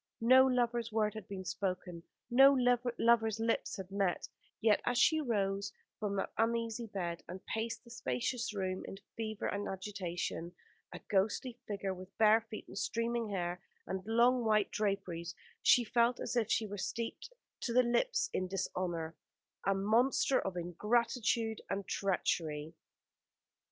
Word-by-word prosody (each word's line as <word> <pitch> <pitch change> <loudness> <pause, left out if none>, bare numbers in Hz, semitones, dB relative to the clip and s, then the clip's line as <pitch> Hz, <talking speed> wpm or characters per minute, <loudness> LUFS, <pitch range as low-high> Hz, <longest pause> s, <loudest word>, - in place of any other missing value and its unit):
No 260 +3 +7
lovers' 240 -2 +1
word 215 -1 +1
had 220 -3 -8
been 190 -2 -6
spoken, 180 -3 -3 0.3
no 270 +3 +8 0.4
lovers' 225 -2 +3
lips 225 0 0
had 190 -1 -7
met; 195 -3 0 0.3
yet 215 0 +4
as 245 - 0
she 315 +4 +4
rose 200 -5 -1 0.3
from 205 -2 -2
that 195 - -2
uneasy 230 0 0
bed, 175 -5 -4
and 185 +1 -8
paced 225 +1 -3
the 235 - -15
spacious 225 - -2
room 190 -2 -2
in 195 - -7 0.2
fever 215 -2 -4
and 200 0 -2
agitation, 185 -3 -4 0.4
a - - -7
ghostly 220 +5 0
figure, 200 -2 -2
with 185 +1 -11
bare 220 +1 +6
feet 220 -1 -9
and - - -6
streaming 230 +1 -1
hair, 180 -2 -2 0.2
and 190 0 -4
long 240 +2 +4
white 215 -2 +2
draperies, 185 -5 -2 0.3
she 245 - +6
felt 235 +2 +2
as - - -3
if 230 -3 +1
she 225 - +2
were 205 -1 -6
steeped 230 - -4 0.3
to 240 - -3
the 250 +2 +5
lips 460 - +1
in 185 - -1
dishonour 175 -3 -3 0.5
a 195 - +3
monster 235 +7 +3
of 190 -2 -4
ingratitude 225 +5 0
and 195 -1 -3
treachery. 160 -5 -1
210 Hz, 150 wpm, -34 LUFS, 190-235 Hz, 0.5 s, no